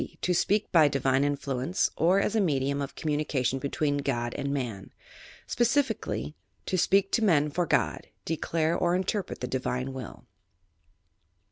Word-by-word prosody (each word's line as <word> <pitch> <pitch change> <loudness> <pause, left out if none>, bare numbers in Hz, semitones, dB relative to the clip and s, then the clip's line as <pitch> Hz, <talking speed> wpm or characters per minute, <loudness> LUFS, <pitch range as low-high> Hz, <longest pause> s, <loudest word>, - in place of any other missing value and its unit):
To 180 - +1
speak 205 +4 +1
by 160 -4 +6
divine 135 -1 +1
influence, 140 +2 -1
or 180 +4 +3
as 210 - 0
a 220 - +3
medium 140 -5 0
of 140 - -5
communication 145 -4 -1
between 145 +1 -1
God 120 -4 -2
and 140 - -3
Man. 120 -9 -4 0.5
Specifically: 240 - 0 0.3
To - - -1
apeak 190 +2 +3
to 230 - +2
men 150 -7 +3
for 175 +3 -1
God) - - 0 0.2
declare 165 0 0
or 175 0 +1
interpret 190 +1 -2
the 125 - -2
divine 130 0 -2
will. 130 -5 -8
150 Hz, 145 wpm, -28 LUFS, 135-180 Hz, 0.5 s, by